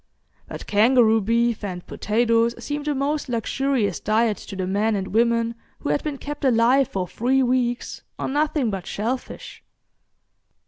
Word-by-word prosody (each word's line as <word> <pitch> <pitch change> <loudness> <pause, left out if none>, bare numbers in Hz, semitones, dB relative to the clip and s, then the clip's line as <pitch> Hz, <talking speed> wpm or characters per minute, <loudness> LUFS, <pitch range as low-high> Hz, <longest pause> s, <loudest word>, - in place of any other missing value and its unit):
But - - -8
kangaroo 225 +1 +4
beef 230 +2 +1
and 180 -3 -5
potatoes 230 +1 +1
seemed 290 0 -5
a 295 - 0
most 285 +1 -1
luxurious 235 -3 0
diet 215 0 +1
to 200 - -9
the 185 -1 -2
men 210 +4 +1
and 195 -1 -3
women 230 0 +2 0.3
who - - -3
had - - 0
been 300 -2 -3
kept 290 +2 -7
alive 255 +1 +4
for 185 -2 -3
three 260 +8 +1
weeks 245 -1 -1 0.2
on - - -3
nothing 295 -5 +1
but 190 -3 -5
shellfish. 240 +5 -5
235 Hz, 150 wpm, -23 LUFS, 215-265 Hz, 0.3 s, kangaroo